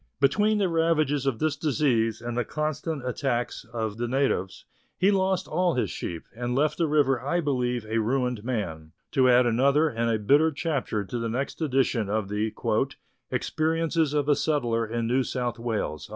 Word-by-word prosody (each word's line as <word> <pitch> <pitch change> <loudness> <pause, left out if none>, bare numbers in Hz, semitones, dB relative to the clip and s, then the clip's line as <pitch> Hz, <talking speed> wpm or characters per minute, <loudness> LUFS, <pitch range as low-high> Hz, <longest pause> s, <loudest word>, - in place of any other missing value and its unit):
Between 210 +10 +3
the 200 -2 +2
ravages 155 -4 +1
of 130 -4 +1
this 155 +1 0
disease 125 -7 +1
and 120 0 -4
the 120 - +1
constant 155 0 -3
attacks 125 -2 -2
of 110 -2 -3
the 120 +1 -2
natives, 125 -8 -1 0.3
he 195 +2 +4
lost 190 -1 +1
all 175 0 +1
his 125 - 0
sheep, 85 -2 -5
and 120 +1 -2
left 150 +3 +1
the 165 - +2
river 145 -4 +2
I 160 +6 0
believe 125 -6 -1
a 110 +1 -1
ruined 125 -1 0
man, 85 -10 -4 0.2
to 130 -1 +4
add 125 0 +5
another 140 +7 +3
and 115 -2 -1
a 115 - +2
bitter 145 +10 +4
chapter 140 -9 -2
to 120 +5 -4
the 115 0 -2
next 135 +7 -3
edition 130 -7 +1
of 105 -1 -1
the 105 +2 -1 0.6
" - - -45
Experiences 160 -1 0
of 145 -1 +1
a 145 - +4
Settler 120 -7 0
in 115 +1 -2
New 125 +3 +2
South 125 -2 -3
Wales." 110 -10 -3
130 Hz, 180 wpm, -26 LUFS, 115-150 Hz, 0.6 s, add